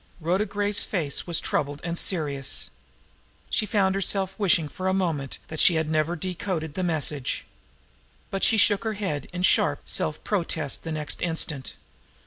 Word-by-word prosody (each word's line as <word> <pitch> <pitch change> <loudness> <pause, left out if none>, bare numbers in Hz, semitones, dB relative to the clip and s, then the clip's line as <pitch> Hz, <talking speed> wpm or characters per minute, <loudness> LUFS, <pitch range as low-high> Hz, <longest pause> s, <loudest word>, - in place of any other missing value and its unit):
Rhoda 180 +6 +1
Gray's 205 +1 +1
face 160 -7 -2
was 170 -2 +3
troubled 145 0 -1
and 170 0 -2
serious. 145 - 0 0.8
She 215 - +1
found 190 -2 +2
herself 195 0 +1
wishing 170 -6 +3
for 185 +5 -4
a 190 - +2
moment 160 -8 -1
that 155 - -5
she 175 - +6
had 160 -1 +1
never 155 +2 +1
decoded 175 -2 -3
the 185 - -3
message. 150 -6 0 0.9
But 195 - -2
she 225 - +5
shook 205 0 +5
her 220 -1 -1
head 190 -8 -3
in 180 0 -3
sharp - - +3
self - - -1
protest 165 -7 -1
the 165 - -4
next 150 -1 -2
instant. 160 -5 -2
170 Hz, 160 wpm, -26 LUFS, 155-195 Hz, 0.9 s, she